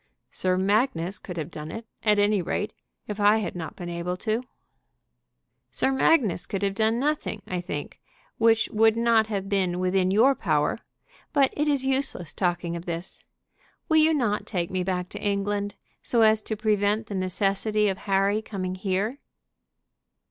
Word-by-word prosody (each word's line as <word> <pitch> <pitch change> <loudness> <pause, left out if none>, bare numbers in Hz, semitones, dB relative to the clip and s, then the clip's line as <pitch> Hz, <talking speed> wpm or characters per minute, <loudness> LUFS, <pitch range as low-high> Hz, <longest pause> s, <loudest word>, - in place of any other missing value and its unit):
"Sir 185 0 0
Magnus 195 -2 +1
could 180 -2 -8
have 160 +1 -4
done 155 -1 -7
it, 225 +7 -7 0.2
at 210 -1 +3
any 205 -1 +3
rate, 205 +5 -2 0.3
if 210 0 -5
I 205 +1 +5
had 195 -6 -3
not 165 -3 -6
been 175 - -7
able." 175 +1 -3 1.5
"Sir 265 - 0
Magnus 265 - +2
could 195 0 -3
have 195 -1 +1
done 220 +3 +1
nothing, 280 -7 -1
I 180 -1 -3
think, 150 -5 -6 0.4
which 225 0 +4
would 220 +1 +4
not 230 -1 +3
have 200 -3 -3
been 190 -3 0
within 185 0 +2
your 230 +8 +5
power. - - 0 0.5
But 275 -3 +3
it 300 +1 0
is 280 -3 +1
useless 265 - -1
talking 175 -2 -1
of 170 +1 -6
this. 170 0 -6 0.7
Will 315 - +4
you 315 +1 +6
not 215 -7 0
take 175 -4 -2
me 185 -1 -1
back 180 -1 -2
to - - -8
England, 205 0 -1 0.3
so 235 -2 +2
as 220 0 +4
to 215 0 -4
prevent 210 0 +1
the 205 - -7
necessity 195 +3 0
of 190 -2 -1
Harry 200 +1 +1
coming 185 -4 -4
here?" 195 +7 -2
205 Hz, 165 wpm, -26 LUFS, 185-220 Hz, 1.5 s, you